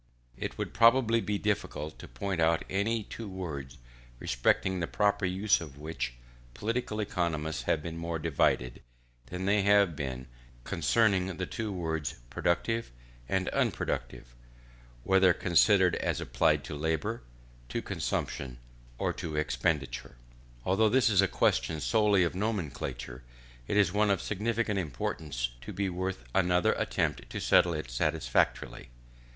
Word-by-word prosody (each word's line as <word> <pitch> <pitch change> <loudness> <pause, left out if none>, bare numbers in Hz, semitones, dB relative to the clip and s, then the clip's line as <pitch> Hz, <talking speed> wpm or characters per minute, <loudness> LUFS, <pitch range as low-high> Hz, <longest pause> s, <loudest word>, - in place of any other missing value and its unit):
It - - -5
would - - -4
probably 115 0 +5
be 105 -1 -1
difficult 95 -7 -2
to - - -9
point 85 +9 -3
out 80 0 +3
any 110 +3 0
two 110 +1 -7
words, 75 -8 -6 0.4
respecting 65 +10 +1
the 85 - -1
proper 100 -2 +1
use 95 +2 +2
of 75 -4 -9
which 75 -5 -4 0.4
political 115 0 -2
economists 80 - -1
have 75 - +1
been 85 0 -5
more 85 0 -2
divided, 70 -5 +1 0.5
than 90 +7 -4
they 100 +1 +3
have 100 -4 +4
been 65 -4 -4 0.4
concerning 95 - +2
the 90 - -2
two 110 +3 -4
words 80 -5 -2 0.2
productive 115 +7 0 0.4
and 95 +3 0
unproductive; - - -2 0.7
whether 95 +1 +5
considered 90 +1 +4
as - - -1
applied - - +2
to - - -7
labour, 80 +9 -1 0.5
to - - -2
consumption, 65 -2 -3 0.4
or - - 0
to 80 -2 -5
expenditure. 75 -5 -1 0.5
Although 105 +4 +3
this 120 -2 +4
is 100 -2 +5
a 95 - +3
question 70 -1 +1
solely 105 -1 +3
of 85 - 0
nomenclature, 75 - -3 0.5
it - - 0
is 95 -4 +4
one 105 0 +3
of 100 - +2
sufficient 105 0 -1
importance 70 -4 -3
to - - -7
be 100 -1 -1
worth 95 -5 -3
another 90 -1 +3
attempt - - -1
to - - -4
settle 85 -2 +4
it 75 -6 -5
satisfactorily. 75 +1 0
90 Hz, 140 wpm, -30 LUFS, 75-105 Hz, 0.7 s, probably